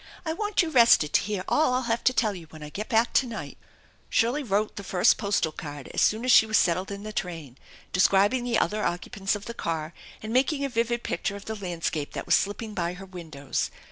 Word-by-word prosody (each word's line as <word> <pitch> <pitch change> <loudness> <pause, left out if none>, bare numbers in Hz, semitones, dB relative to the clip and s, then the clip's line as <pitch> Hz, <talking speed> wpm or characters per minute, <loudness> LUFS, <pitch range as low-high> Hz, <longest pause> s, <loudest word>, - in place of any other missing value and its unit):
I 320 - -1
want 415 +1 +1
you 325 - -3
rested 230 - +5
to - - +5
hear 205 -3 -3
all 295 -5 +2
I'll 255 - +1
have 235 -1 -1
to - - +6
tell 220 -4 +1
when 160 -3 -11
I 150 - -7
get 215 +7 -5
back 230 0 +2
to 265 - +3
night! 230 -2 -7 0.3
" - - -34
Shirley 245 +6 +2
wrote 210 -4 -1
the 200 - -6
first 180 -1 +3
postal 200 -6 0
card 145 -3 -8
as - - 0
soon 220 +3 +2
as 255 - +3
she 220 - +7
was 220 - +3
settled 180 +2 +1
in 200 0 -6
the 215 0 -7
train, 165 - -5 0.4
describing 200 +6 +3
the 240 -2 +1
other 210 0 0
occupants 195 +3 -2
of 205 0 -7
the 235 - -6
car, 165 -6 -3 0.3
and 215 +1 -4
making 275 +3 +2
a - - -2
vivid 235 0 -1
picture 195 +4 -2
of 200 - -10
the 220 - -4
landscape 170 -6 -3
that - - -5
was - - +2
slipping 210 +2 0
by 175 -2 -2
her 195 +2 -10
windows. 160 -7 -4
205 Hz, 235 wpm, -26 LUFS, 175-235 Hz, 0.4 s, she